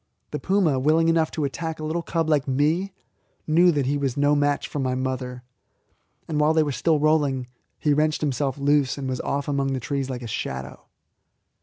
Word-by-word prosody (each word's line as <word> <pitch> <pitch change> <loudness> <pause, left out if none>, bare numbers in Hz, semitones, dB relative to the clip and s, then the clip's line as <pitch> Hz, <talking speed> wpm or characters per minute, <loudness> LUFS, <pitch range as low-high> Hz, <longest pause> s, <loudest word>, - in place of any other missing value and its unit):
The - - -3
puma, 185 -9 +2
willing 160 +4 +3
enough 165 -1 +2
to 155 - -3
attack 160 +3 -4
a - - -6
little 160 +2 -1
cub 165 -1 -1
like 150 -3 +1
me, 155 +8 +1 0.5
knew 175 +3 +5
that 145 -4 0
he 145 +2 0
was 135 -2 -2
no 145 +1 +3
match 145 0 +1
for 145 - -5
my 130 -1 0
mother, 130 -1 -3 0.8
and 155 -2 -1
while 155 +1 +3
they 160 - +4
were 145 - -2
still 150 +5 +1
rolling 145 -4 +2 0.3
he 150 - +1
wrenched 155 +1 +1
himself 140 -2 -1
loose, 145 -1 +2
and 135 -1 -4
was 130 -1 -2
off 140 0 -2
among 140 -1 0
the 130 - -1
trees 135 +1 -3
like 125 -1 -5
a - - -5
shadow. 65 -10 -5
145 Hz, 200 wpm, -24 LUFS, 135-155 Hz, 0.8 s, knew